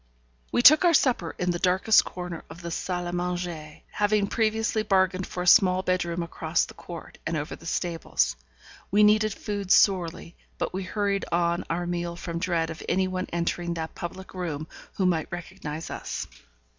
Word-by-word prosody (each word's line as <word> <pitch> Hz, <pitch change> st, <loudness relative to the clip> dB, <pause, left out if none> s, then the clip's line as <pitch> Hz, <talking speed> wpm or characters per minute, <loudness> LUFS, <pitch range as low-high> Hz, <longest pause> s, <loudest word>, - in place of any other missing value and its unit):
We 240 Hz, -, +2 dB
took 305 Hz, +7 st, +9 dB
our 345 Hz, -2 st, +5 dB
supper 240 Hz, -13 st, +1 dB
in 180 Hz, 0 st, 0 dB
the 175 Hz, -, -3 dB
darkest 190 Hz, +5 st, +4 dB
corner 180 Hz, -2 st, -6 dB
of 175 Hz, -, -11 dB
the 170 Hz, -, -4 dB
salle 180 Hz, +1 st, -2 dB
à 175 Hz, -, -4 dB
manger, 175 Hz, -3 st, -4 dB
having 205 Hz, 0 st, +2 dB
previously 220 Hz, +1 st, 0 dB
bargained 190 Hz, -3 st, +1 dB
for 180 Hz, -, -4 dB
a -, -, -5 dB
small 185 Hz, -1 st, +6 dB
bedroom 175 Hz, -2 st, 0 dB
across 160 Hz, 0 st, -1 dB
the -, -, -12 dB
court, 170 Hz, -2 st, -10 dB
and 160 Hz, 0 st, -2 dB
over 150 Hz, 0 st, -4 dB
the 165 Hz, -, -12 dB
stables. 165 Hz, -, 0 dB, 0.5 s
We 210 Hz, +2 st, +4 dB
needed 215 Hz, +1 st, +4 dB
food 200 Hz, -1 st, -4 dB
sorely; 180 Hz, -4 st, +3 dB, 0.2 s
but -, -, -2 dB
we 190 Hz, -, -2 dB
hurried 200 Hz, +1 st, -1 dB
on 170 Hz, 0 st, +1 dB
our 175 Hz, +1 st, -1 dB
meal 175 Hz, 0 st, -3 dB
from 170 Hz, -1 st, -5 dB
dread 170 Hz, -2 st, 0 dB
of 160 Hz, -, -8 dB
any 190 Hz, 0 st, +2 dB
one 185 Hz, 0 st, -3 dB
entering 170 Hz, 0 st, -1 dB
that 160 Hz, -1 st, -4 dB
public 185 Hz, +2 st, -7 dB
room 165 Hz, -5 st, -4 dB, 0.3 s
who 190 Hz, -, 0 dB
might 165 Hz, -4 st, 0 dB
recognize 165 Hz, -3 st, -6 dB
us. -, -, -4 dB
180 Hz, 180 wpm, -26 LUFS, 170-195 Hz, 0.5 s, took